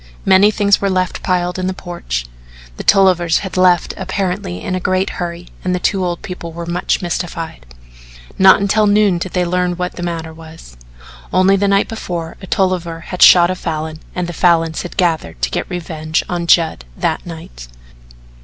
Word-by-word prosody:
Many 195 +2 +6
things 205 -1 +2
were 200 - +1
left 185 -1 -1
piled 180 0 -1
in 185 - -1
the 185 - -2
porch; 65 - -5 0.5
the - - -6
Tollivers 180 -4 +4
had 190 - -6
left 180 -2 +3
apparently 185 - -3
in 185 - -4
a 185 - -1
great 185 +1 0
hurry 175 0 -5
and 180 0 0
the - - -2
two 190 +1 0
old 175 -1 -3
people 180 -3 -7
were 170 +1 -7
much 175 +2 -1
mystified. 165 - -4 0.7
Not 190 0 +7
until 210 +2 +2
noon 205 -3 +3
did 185 +1 -5
they 180 -1 +1
learn 180 0 0
what 180 0 -4
the - - -5
matter 165 -2 -4
was. 160 - -13 0.6
Only 185 +1 +4
the 200 +1 +1
night 200 0 +2
before 175 -7 -5
a 190 - -9
Tolliver 180 -4 -1
had 180 +1 -7
shot 175 0 +8
a - - -2
Falin 155 -2 -4 0.2
and 180 - -1
the 175 - -6
Falins 165 -2 +2
had 175 - -9
gathered 160 - 0
to - - +1
get - - -3
revenge 160 -2 -3
on 175 -1 -3
Judd 165 - +3
that - - -1
night. 160 - -10
175 Hz, 185 wpm, -17 LUFS, 165-185 Hz, 0.7 s, shot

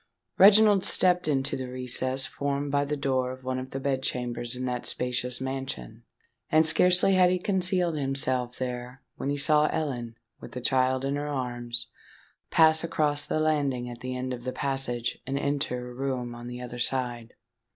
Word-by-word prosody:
Reginald 205 0 +7
stepped 180 -2 +2
into 135 -2 0
the 130 -1 -5
recess 130 +1 -1
formed 140 0 -2
by 145 0 +2
the 150 +1 -2
door 130 -2 0
of 130 0 -10
one 130 0 -2
of 130 0 -7
the 135 - -4
bed 135 -1 -1
chambers 120 -2 -3
in 130 +1 -4
that 125 -1 -1
spacious 125 0 -1
mansion; 130 - -5 0.5
and 160 +1 +4
scarcely 180 +4 +4
had 185 -1 +5
he 185 - +2
concealed 180 -2 +1
himself 130 -3 -1
there 125 +1 -5
when 140 - -3
he 145 - -1
saw 150 +1 +4
Ellen, 120 -7 -3 0.2
with - - -11
the 125 - -4
child 130 +1 +1
in 140 +1 -1
her 145 0 -3
arms, 120 -4 -3 0.6
pass 160 0 +5
across 145 -3 0
the - - 0
landing 140 -5 0
at 120 -1 -9
the 130 0 -5
end 130 0 -3
of 120 -1 -7
the 130 - -2
passage, 130 -4 -2
and 135 +1 -1
enter 140 -3 -2
a - - -10
room 125 -2 -3
on 120 0 -9
the 125 0 -7
other 120 0 -7
side. 120 -2 -2
130 Hz, 185 wpm, -27 LUFS, 125-145 Hz, 0.6 s, Reginald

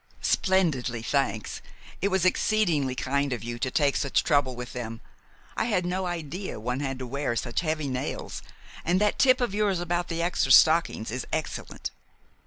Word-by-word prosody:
"Splendidly, 140 - +1
thanks. 125 -4 -1 0.4
It 195 - +2
was 190 -2 +1
exceedingly 175 -9 +2
kind 140 +2 0
of 125 - -3
you 120 0 -5
to 130 - 0
take 140 +1 +2
such 140 - +1
trouble 145 -4 +2
about 125 0 -7
them. 115 -2 -5 0.6
I - - 0
had 200 -6 +1
no 185 +1 -1
idea 175 - -4
one 125 +4 -2
had 135 -2 -2
to 130 - -5
wear 135 -1 -2
such 120 +1 -1
heavy 155 -3 -1
nails, 130 -1 -4 0.4
and 180 +3 +2
that 210 0 +1
tip 255 -1 +5
of 245 -5 0
yours 205 -3 +1
about 175 0 -1
the 170 0 -2
extra 170 -6 +1
stockings 155 -7 +5
is 125 +1 -4
excellent." - - -4
145 Hz, 175 wpm, -27 LUFS, 125-180 Hz, 0.6 s, tip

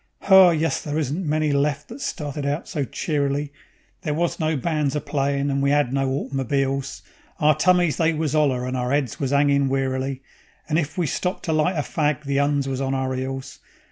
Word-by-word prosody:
Ho 190 -2 +8
yus, 165 -1 0
there 150 0 -3
isn't 160 +4 -2
many 155 0 +1
left 140 +1 0
that 245 +5 -9
started 150 - -4
out 145 +3 -2
so 145 - -2
cheerily; 145 0 -2 0.5
There 155 -5 -2
was 170 +1 -1
no 155 -1 0
bands 150 0 -1
a - - +1
playin' 140 -1 -1
and 140 0 0
we 140 0 +2
'ad 145 -3 +2
no 135 -1 +1
autmobeels. 135 0 -2 0.4
Our 155 0 +5
tummies 175 0 +3
they 165 0 +3
was 155 -2 -1
'oller, 135 -5 +2
and 130 0 -3
our 125 0 -1
'eads 140 -4 -1
was 135 -2 -1
'angin' 140 -1 +3
wearily, 135 0 -2 0.4
And 155 +1 +1
if 160 +1 -4
we 175 - +1
stopped 180 +6 -2
to 160 - 0
light 155 +4 +2
a 150 - 0
fag 150 -1 -1
the 140 -1 0
'Uns 145 -1 +1
was 135 0 -2
on 135 0 -1
our 130 0 -1
'eels. 135 +1 -5
145 Hz, 205 wpm, -23 LUFS, 135-155 Hz, 0.5 s, Ho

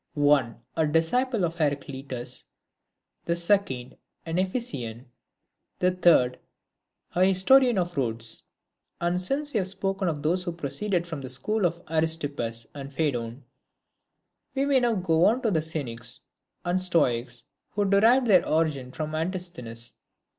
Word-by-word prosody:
One, 145 -6 +2
a 160 - +2
disciple 200 - +1
of 165 - -2
Heraclitus; 135 -4 -3 0.8
the 170 - +1
second, 170 -8 0 0.3
an 165 +2 -1
Ephesian; 135 - -3 0.7
the 180 0 +2
third, 165 -9 +4 0.7
a 180 - +3
historian 220 +6 +5
of 175 -1 -1
Rhodes. 115 -4 0 0.6
And 175 +1 0
since 285 +9 0
we 220 - +2
have 190 - -1
spoken 195 0 -1
of 150 -4 -2
those 175 +4 +1
who 175 -2 -3
proceeded 170 +4 -2
from 165 -5 -6
the 130 - -6
school 205 - 0
of 170 +1 -7
Aristippus 145 -8 -1
and 140 -1 -8
Phaedon, 130 -4 -2 1.1
we 275 +1 +1
may 280 -2 +4
now 240 -2 +2
go 170 -3 +2
on 240 +4 +3
to 225 - +2
the 160 -4 +2
Cynics 140 -8 -5 0.4
and 180 +1 +1
Stoics, 125 -9 +1 0.3
who 205 -1 +1
derived 225 +6 +5
their 195 -6 +5
origin 150 -5 0
from 155 +2 -4
Antisthenes. 155 -9 -4
165 Hz, 140 wpm, -26 LUFS, 135-190 Hz, 1.1 s, historian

